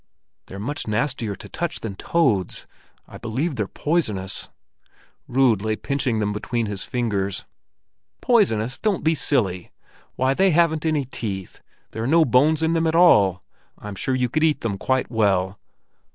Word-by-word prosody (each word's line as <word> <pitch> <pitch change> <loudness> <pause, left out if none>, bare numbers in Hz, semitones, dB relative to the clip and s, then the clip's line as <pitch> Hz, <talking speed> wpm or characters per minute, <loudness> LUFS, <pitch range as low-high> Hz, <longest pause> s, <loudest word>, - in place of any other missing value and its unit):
"They're 95 - -9
much 115 +8 -4
nastier 110 -1 -1
to - - -11
touch - - -4
than 110 -3 -4
toads. 105 - 0 0.4
I - - -11
believe 130 +8 -2
they're 105 -4 -2
poisonous." 110 - -2 0.8
Rud 125 -5 +3
lay 110 0 -1
pinching 130 -1 -1
them 105 -1 0
between 115 +2 -2
his 100 -2 -3
fingers. 105 -6 -2 0.7
"Poisonous! 135 - +2
Don't 210 -5 0
be 160 - +3
silly! 100 - +1 0.5
Why, 130 +1 +2
they 190 +6 +3
haven't 160 -1 +2
any 150 -3 0
teeth! 100 -7 -6 0.3
There 110 - -5
are 115 - -1
no 160 +3 +5
bones 150 +5 +3
in 160 +1 +2
them 165 0 +1
at 160 - 0
all; 105 - +5 0.3
I'm 105 0 -8
sure 130 +7 -1
you 125 -1 +1
could 155 +6 -1
eat 155 -2 +2
them 100 -4 -3
quite 130 -1 0
well." 100 -4 +1
125 Hz, 160 wpm, -23 LUFS, 105-155 Hz, 0.8 s, no